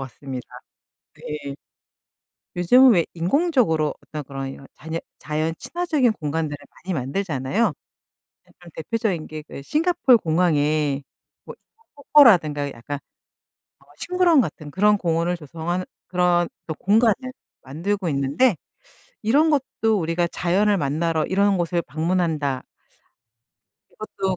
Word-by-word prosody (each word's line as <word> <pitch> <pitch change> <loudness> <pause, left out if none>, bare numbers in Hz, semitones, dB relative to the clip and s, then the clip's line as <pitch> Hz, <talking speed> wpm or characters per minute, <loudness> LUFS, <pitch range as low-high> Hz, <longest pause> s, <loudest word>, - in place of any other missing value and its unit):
같습니다. 130 -1 -7 0.7
네. 145 -2 -6 1.0
요즘은 250 +9 +6
왜 170 -5 +2
인공적으로 175 - +1
어떤 150 -1 -6
그런 135 0 -6
이런 135 0 -11
자녀 160 +1 -5 0.2
자연 155 +1 -2
친화적인 310 -9 0
공간들을 150 -2 -3 0.3
많이 190 - -2
만들잖아요. 145 - -1 0.8
네 - - -24
좀 175 - -13
대표적인 190 -2 -2
게 155 0 -7
그 - - -9
싱가폴 305 - +3
공항에 155 -4 +1 0.4
뭐 - - -9
인공 455 0 -37
폭포라든가 175 - +4
약간 130 +5 -6 0.8
어 - - -25
식물원 360 -5 +3
같은 155 -6 -6
그런 210 +5 +3
공원을 170 -1 0
조성하는 170 +4 -4 0.2
그런 175 -1 +2 0.2
또 160 - -2
공간을 215 +5 +3 0.5
만들고 175 +7 -2
있는데 140 - +2 0.7
이런 285 +9 +3
것도 225 -6 0
우리가 165 +1 0
자연을 200 +5 +1
만나러 160 +1 0
이런 200 +1 +2
곳을 175 0 0
방문한다 155 -5 -1 1.3
이것도 195 -3 -3
170 Hz, 280 characters per minute, -23 LUFS, 150-210 Hz, 1.3 s, 요즘은